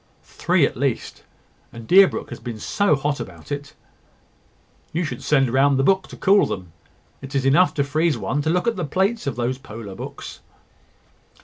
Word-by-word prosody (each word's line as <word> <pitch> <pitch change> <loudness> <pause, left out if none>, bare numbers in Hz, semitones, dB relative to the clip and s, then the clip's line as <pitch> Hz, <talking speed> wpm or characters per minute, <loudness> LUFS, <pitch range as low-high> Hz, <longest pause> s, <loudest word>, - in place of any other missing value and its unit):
"Three - - +1
at - - -3
least; - - -2 0.5
and 115 -1 -10
Deerbrook 190 -5 +4
has 120 - -7
been 115 -1 -6
so 200 - +1
hot 145 +1 -2
about - - -9
it 145 +2 -5 0.6
" - - -37
"You 170 +3 0
should 155 - -5
send 135 -5 +2
round 135 +1 +4
the 135 - +2
book 190 +4 +2
to - - -11
cool 200 +1 +4
them. 90 -3 -6 0.5
It 135 +1 -8
is 135 -1 0
enough 150 +7 +4
to 140 - +1
freeze 155 +1 0
one 140 +5 -2
to 155 - -1
look 180 +4 +1
at 230 - 0
the 180 - -2
plates 190 +7 -1
of 140 - -2
those 125 +2 -2
polar 110 -6 -9
books." - - -8
145 Hz, 190 wpm, -22 LUFS, 130-175 Hz, 0.6 s, Deerbrook